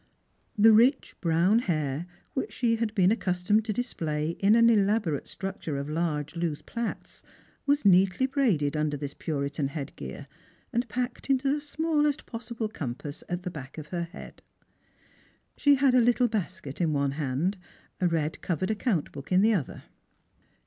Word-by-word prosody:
The 220 +2 +7
rich 245 +6 +4
brown 175 +6 +3
hair, 155 - -2 0.3
which 265 - -2
she 230 -2 +1
had 220 -2 -2
been 190 -1 +4
accustomed 205 0 +1
to 220 - -1
display 160 -10 -2
in 200 +3 +5
an 230 0 +6
elaborate 205 -8 +2
structure 190 -6 -4
of 140 +1 -4
large 155 -2 -2
loose 165 -3 -2
plaits, 235 -1 -5 0.5
was 285 -3 +2
neatly 190 +4 +5
braided 220 - +1
under 150 -1 0
this 140 0 -5
Puritan 140 -2 -2
head 140 -1 -6
gear, 65 -2 -7 0.5
and 240 +1 0
packed 250 +3 -3
into 270 +1 +2
the 300 - -1
smallest 300 -1 0
possible 230 -1 -4
compass 145 - -6
at 175 0 -3
the 180 - -4
back 140 -3 -9
of 150 -1 -8
her 170 -2 -2
head, 175 +4 -12 1.1
She 285 -1 +5
had 270 -1 +3
a 250 - +6
little 245 +1 +3
basket 180 - -4
in 160 -3 +2
one 140 -1 +1
hand, 145 +6 -1 0.4
a 180 - +3
red 160 -2 -1
covered 185 +3 -1
account 210 - -1
book 140 +3 -10
in 185 +2 +5
the 225 +1 +5
other. 170 -10 -3
185 Hz, 165 wpm, -28 LUFS, 150-230 Hz, 1.1 s, The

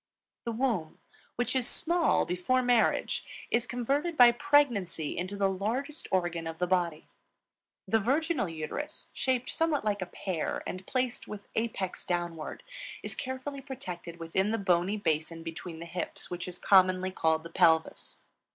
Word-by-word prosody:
The 235 - -1
womb, 225 -9 -1 0.4
which 245 +2 -1
is 255 -2 +4
small 340 0 +3
before 180 +9 +1
marriage, 245 -2 +2 0.3
is 240 +1 +1
converted 275 +8 -1
by 245 -1 +9
pregnancy 240 - +2
into 185 +3 -3
the 200 -1 +3
largest 230 +11 -2
organ 175 -3 0
of 165 0 -5
the 180 - +1
body. 175 -3 0 0.8
The 225 - +3
virginal 275 - +1
uterus, 165 - -5
shaped 255 -1 0
somewhat 320 -6 0
like 205 -2 0
a 185 - -2
pear, 180 -2 -3
and 185 +1 -6
placed 255 -2 -1
with 205 -1 -8
apex 220 -5 -2
downward, 175 -3 -3 0.4
is - - -4
carefully 260 +2 -5
protected 180 - -7
within 180 +5 0
the 225 - +1
bony 190 0 +2
basin 165 -3 -1
between 165 +1 -6
the 165 - -7
hips, 175 +1 -5
which 180 +1 -4
is 180 -1 -4
commonly 185 -1 +4
called 160 -3 +1
the 165 - -9
Pelvis. 160 -1 +2
195 Hz, 150 wpm, -30 LUFS, 175-255 Hz, 0.8 s, by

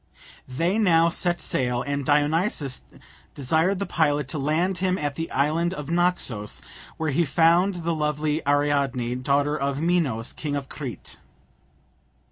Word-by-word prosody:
They 170 +11 0
now 170 -5 +4
set 175 +1 -1
sail, 125 -1 -1
and 140 0 -2
Dionysus 145 - +1 0.5
desired 160 +8 +1
the 200 - -2
pilot 145 -6 +1
to 150 - -3
land 165 +6 0
him 185 0 +1
at 145 -4 -2
the 165 +2 -4
island 165 +6 0
of 150 -1 -6
Naxos, 170 - 0 0.4
where 160 -2 -1
he 170 +5 +2
found 170 +4 +3
the 170 0 0
lovely 150 0 -1
Ariadne, 140 -4 +1
daughter 145 +2 +1
of 140 -1 -2
Minos, 155 -9 0
king 145 -2 -4
of 140 -1 -4
Crete. 135 -6 -7
150 Hz, 140 wpm, -24 LUFS, 140-170 Hz, 0.5 s, now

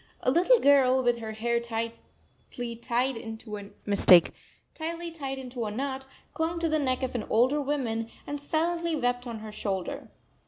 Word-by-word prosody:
A 255 - +2
little 365 - +5
girl, 265 -2 +5
with 240 -1 +2
her 220 -1 -5
hair 235 +2 0
tightly 230 +1 -6
tied 245 +2 0
into 225 -1 -7
a 200 -1 -8 2.0
knot, 265 +3 -3 0.3
clung 325 +1 -1
to 335 - +1
the 310 -1 +1
neck 260 -2 0
of 260 - -2
an 240 - -2
older 255 +6 +3
woman 240 -6 -1 0.2
and 290 0 -4
silently 335 +2 0
wept 245 -2 -1
on 230 -2 -5
her 215 -1 -7
shoulder. 195 -3 -3
250 Hz, 145 wpm, -28 LUFS, 230-285 Hz, 2.0 s, little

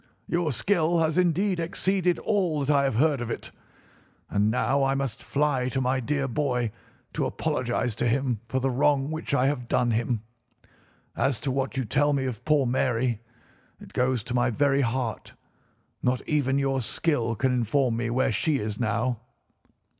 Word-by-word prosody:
Your 170 -2 0
skill 170 - +1
has 160 +2 +2
indeed 180 +2 +1
exceeded 180 +1 +1
all 180 -9 0
that 145 +1 +3
I 140 0 +3
have 135 - 0
heard 140 +1 +2
of 120 - -4
it. - - -5 0.8
And 105 +1 +2
now 125 +4 +1
I 135 0 +2
must 135 -4 -3
fly 140 -3 0
to 130 - -1
my 130 +1 +1
dear 140 +2 -1
boy 125 -4 -1 0.4
to - - 0
apologise 120 -1 -1
to 120 - +1
him 125 -2 0
for 130 - 0
the 135 +1 0
wrong 140 +2 +2
which 160 -2 -2
I 130 - +3
have 135 -4 -1
done 120 0 +2
him. 115 0 -1 0.9
As 135 -3 +1
to 135 - -1
what 135 +1 -2
you 130 - 0
tell 145 +6 +2
me 135 -1 0
of 125 -2 -4
poor 150 -3 +3
Mary, 120 -2 0 0.6
it - - -13
goes 125 -2 +1
to 120 - -5
my 120 0 +2
very 140 +3 +2
heart. 120 -2 -2 0.7
Not 125 0 -1
even 140 -3 +1
your 135 -1 +1
skill 120 -2 0
can 130 +2 +1
inform 125 +1 +1
me 120 0 -2
where 130 +2 +1
she 140 +7 +1
is 105 -3 -4
now." 120 0 0
130 Hz, 175 wpm, -26 LUFS, 120-145 Hz, 0.9 s, that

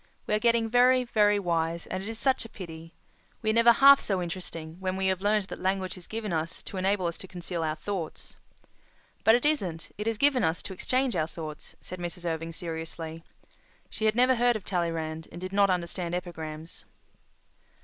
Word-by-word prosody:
"We - - -1
are 210 - +3
getting 230 0 +3
very, 250 +2 +5
very 210 -3 +3
wise, 170 -3 -1
and 185 - -4
it 200 - -5
is 225 - -4
such 265 +2 +2
a 225 - -9
pity. 165 -4 -9 0.5
We 220 - +2
are - - 0
never 230 +1 +7
half 275 +3 +8
so 195 -3 0
interesting 170 -2 -6
when 190 0 -2
we 190 - -1
have 190 -1 +1
learned 210 +1 +2
that - - -6
language 185 0 -1
is 180 -2 -10
given 215 -4 -4
us 165 +2 -3
to 195 - -7
enable 190 0 +1
us 170 -1 -2
to 190 - -8
conceal 175 -1 -4
our 155 -1 -1
thoughts." 170 0 -5 0.9
"But 220 - +7
it 245 - 0
isn't—it 210 - -1
is 225 -1 0
given 270 -1 +3
us 160 -2 0
to 190 - -5
exchange 255 +6 0
our 155 - +1
thoughts," 155 -2 -8
said 185 - -8
Mrs. 175 0 -5
Irving 165 0 -2
seriously. 165 0 -6 0.7
She 220 - -2
had 215 0 +3
never 250 +1 +4
heard 240 0 +3
of 215 - -4
Tallyrand 165 -3 -2
and 175 - -8
did 185 +1 -6
not 200 0 +4
understand 175 -1 -1
epigrams. 160 -2 -6
185 Hz, 200 wpm, -28 LUFS, 165-220 Hz, 0.9 s, half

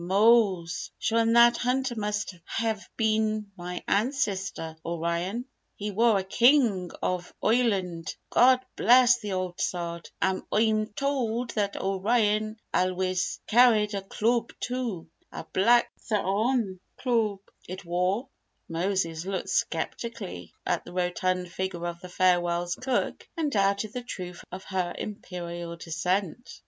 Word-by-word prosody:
"Mose, 195 -3 +3
shure 230 +1 +1
an' 230 0 +3
that 235 0 +7
hunter 255 +1 0
must 210 -2 -2
hev 225 -2 -2
been 215 -2 +1
me 180 -1 -6
ancistor 195 - -1
O'ryan! 170 +7 -2 0.3
He 210 +1 -4
war 225 +1 +4
a 190 - -1
king 225 -3 +3
ov 180 -1 -1
Oireland, 195 -8 +1 0.2
God 255 +1 +6
bliss 250 +1 +6
the 210 -3 -4
old 185 -1 -3
Sod! 170 -1 -3
An' 190 0 +1
Oi'm 215 0 +2
tould 250 -4 -1
that 205 -2 -1
O'ryan 215 +2 +1
alwiss 185 0 0
carried 220 -3 +5
a 200 - -2
cloob 225 +4 0
too: 240 -9 -3 0.2
a - - -6
black 235 +5 +4 0.2
t'horn 210 0 +1 0.2
cloob 225 -6 +1 0.3
it 185 +1 -7
war!" 180 +8 0 0.4
Moses 170 -1 -1
looked 195 -1 -3
sceptically 230 - -3
at - - 0
the 175 - -11
rotund 180 0 -1
figure 185 -2 -3
of 170 0 -4
the 180 - -9
Farwell's 175 -1 +2
cook 255 +3 -2
and 310 -3 0
doubted 200 0 +1
the 250 - -3
truth 180 -7 -7
of 185 +1 -7
her 185 -2 -2
imperial 175 -4 -6
descent. 180 +7 -2
200 Hz, 130 wpm, -27 LUFS, 180-230 Hz, 0.4 s, that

